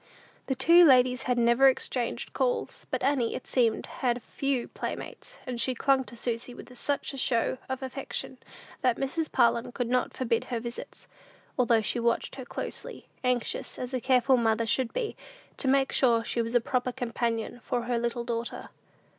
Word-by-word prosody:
The 265 Hz, -, 0 dB
two 335 Hz, +7 st, +7 dB
ladies 255 Hz, -4 st, +5 dB
had 250 Hz, -, +2 dB
never 235 Hz, +3 st, +5 dB
exchanged 255 Hz, -2 st, -1 dB
calls; -, -, -1 dB
but -, -, -2 dB
Annie, 265 Hz, -4 st, +1 dB
it -, -, -6 dB
seemed, 230 Hz, -4 st, +1 dB
had 245 Hz, -2 st, -2 dB
few 275 Hz, -3 st, -1 dB
playmates, -, -, -7 dB
and 245 Hz, -2 st, -3 dB
she 255 Hz, +1 st, +1 dB
clung 270 Hz, +1 st, +2 dB
to 240 Hz, -, -11 dB
Susy 240 Hz, +1 st, -4 dB
with 250 Hz, +1 st, -11 dB
such 285 Hz, +3 st, -2 dB
a -, -, -6 dB
show 245 Hz, 0 st, +1 dB
of 260 Hz, 0 st, -3 dB
affection, 265 Hz, 0 st, -5 dB, 0.4 s
that 250 Hz, -2 st, +2 dB
Mrs. 310 Hz, +4 st, -2 dB
Parlin 235 Hz, 0 st, +2 dB
could 245 Hz, -2 st, -3 dB
not 250 Hz, 0 st, 0 dB
forbid 230 Hz, -3 st, 0 dB
her 240 Hz, -2 st, -3 dB
visits, 235 Hz, +1 st, -8 dB, 0.5 s
although 235 Hz, -3 st, +3 dB
she 235 Hz, -, 0 dB
watched 235 Hz, 0 st, 0 dB
her 260 Hz, -, -6 dB
closely; -, -, -6 dB
anxious, 250 Hz, -2 st, -1 dB
as 250 Hz, +1 st, -5 dB
a 255 Hz, -, -1 dB
careful 255 Hz, +1 st, +4 dB
mother 225 Hz, -1 st, +2 dB
should 245 Hz, +1 st, +1 dB
be, 465 Hz, -3 st, -3 dB, 0.4 s
to 275 Hz, -, -1 dB
make 270 Hz, 0 st, +3 dB
sure 235 Hz, -3 st, +3 dB
she 235 Hz, -, -1 dB
was 230 Hz, +1 st, -3 dB
a -, -, +7 dB
proper 250 Hz, +1 st, -1 dB
companion 235 Hz, -2 st, -2 dB
for 240 Hz, -1 st, -2 dB
her 240 Hz, 0 st, 0 dB
little 235 Hz, 0 st, -2 dB
daughter. 235 Hz, 0 st, -4 dB
250 Hz, 180 wpm, -28 LUFS, 235-265 Hz, 0.5 s, two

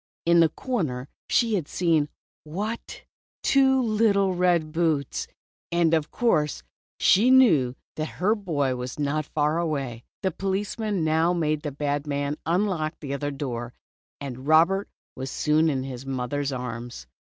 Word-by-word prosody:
In 170 Hz, 0 st, +5 dB
the 165 Hz, -1 st, +6 dB
corner 150 Hz, -, -3 dB, 0.2 s
she 230 Hz, -2 st, +2 dB
had 175 Hz, -8 st, 0 dB
seen 160 Hz, -4 st, +1 dB, 0.2 s
— -, -, -87 dB
what! 205 Hz, +9 st, -5 dB, 0.4 s
Two 265 Hz, -1 st, +4 dB
little 210 Hz, -4 st, +2 dB
red 175 Hz, -3 st, +2 dB
boots. 160 Hz, -4 st, 0 dB, 0.4 s
And 170 Hz, -1 st, +2 dB
of 155 Hz, -2 st, +1 dB
course 150 Hz, -, +1 dB, 0.4 s
she 215 Hz, +7 st, +5 dB
knew 175 Hz, -, +5 dB
then -, -, -27 dB, 0.2 s
that 155 Hz, -, -1 dB
her 200 Hz, +4 st, +2 dB
boy 150 Hz, -, -1 dB
was 125 Hz, 0 st, -5 dB
not 150 Hz, 0 st, -1 dB
far 150 Hz, +2 st, 0 dB
away. 135 Hz, -8 st, -3 dB, 0.2 s
The 190 Hz, -, +1 dB
police 195 Hz, +4 st, -3 dB
man 210 Hz, -6 st, -1 dB
now 160 Hz, +2 st, +2 dB
made 155 Hz, -3 st, 0 dB
the 150 Hz, -2 st, -4 dB
bad 145 Hz, +1 st, -2 dB
man 145 Hz, +1 st, -2 dB
unlock 175 Hz, -3 st, 0 dB
the 140 Hz, -3 st, -5 dB
other 145 Hz, +1 st, -2 dB
door, 125 Hz, -4 st, -5 dB, 0.4 s
and 135 Hz, -1 st, -7 dB
Robert 170 Hz, +6 st, +4 dB, 0.3 s
was 130 Hz, +1 st, -5 dB
soon 155 Hz, +3 st, +2 dB
in 135 Hz, -3 st, -1 dB
his 130 Hz, -1 st, -6 dB
mother's 135 Hz, +2 st, -2 dB
arms. 120 Hz, -, -6 dB
155 Hz, 155 wpm, -25 LUFS, 140-185 Hz, 0.4 s, the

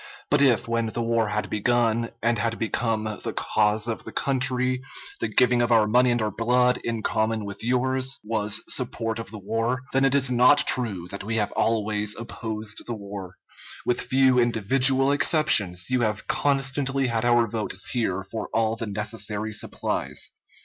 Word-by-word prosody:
But 145 Hz, 0 st, +4 dB
if 125 Hz, -6 st, +3 dB
when 115 Hz, 0 st, -1 dB
the 115 Hz, +2 st, -3 dB
war 115 Hz, -1 st, +1 dB
had 105 Hz, 0 st, -2 dB
begun, 115 Hz, +1 st, 0 dB
and 115 Hz, -1 st, +1 dB
had 115 Hz, +1 st, -1 dB
become 115 Hz, -1 st, -1 dB, 0.2 s
the -, -, -3 dB
cause 105 Hz, +1 st, +1 dB
of 115 Hz, -, -4 dB
the -, -, -9 dB
country, 130 Hz, -1 st, 0 dB, 0.4 s
the -, -, -1 dB
giving 120 Hz, +2 st, +3 dB
of 120 Hz, 0 st, 0 dB
our 115 Hz, -2 st, +5 dB
money 125 Hz, +4 st, +3 dB
and 120 Hz, 0 st, +1 dB
our 105 Hz, -, -1 dB
blood, 125 Hz, +3 st, +2 dB
in 115 Hz, -2 st, -3 dB
common 110 Hz, 0 st, -1 dB
with 100 Hz, +1 st, -7 dB
yours, 130 Hz, +2 st, 0 dB
was 105 Hz, -1 st, 0 dB
support 115 Hz, -3 st, -1 dB
of 115 Hz, -, -7 dB
the 110 Hz, -, -8 dB
war, 115 Hz, +5 st, -2 dB
then 135 Hz, +1 st, +2 dB
it 135 Hz, 0 st, +3 dB
is 135 Hz, -2 st, +3 dB
not 125 Hz, +4 st, +5 dB
true 100 Hz, -9 st, 0 dB
that 100 Hz, -, -7 dB
we 115 Hz, +3 st, -3 dB
have 105 Hz, -2 st, -1 dB
always 105 Hz, -2 st, 0 dB
opposed 110 Hz, -2 st, -5 dB
the 120 Hz, -, -3 dB
war. 100 Hz, -3 st, -8 dB, 0.5 s
With 125 Hz, -, 0 dB
few 130 Hz, -1 st, +3 dB
individual 130 Hz, +4 st, +3 dB
exceptions, 125 Hz, -, +2 dB
you 125 Hz, -1 st, +2 dB
have 110 Hz, -2 st, -1 dB
constantly 135 Hz, -1 st, 0 dB
had 115 Hz, -2 st, -1 dB
our 120 Hz, -1 st, +3 dB
votes 110 Hz, -1 st, -2 dB
here 95 Hz, -6 st, -1 dB
for 110 Hz, +3 st, -6 dB
all 110 Hz, 0 st, +1 dB
the 115 Hz, -1 st, -5 dB
necessary 105 Hz, +1 st, -3 dB
supplies. -, -, -2 dB
115 Hz, 175 wpm, -24 LUFS, 110-125 Hz, 0.5 s, our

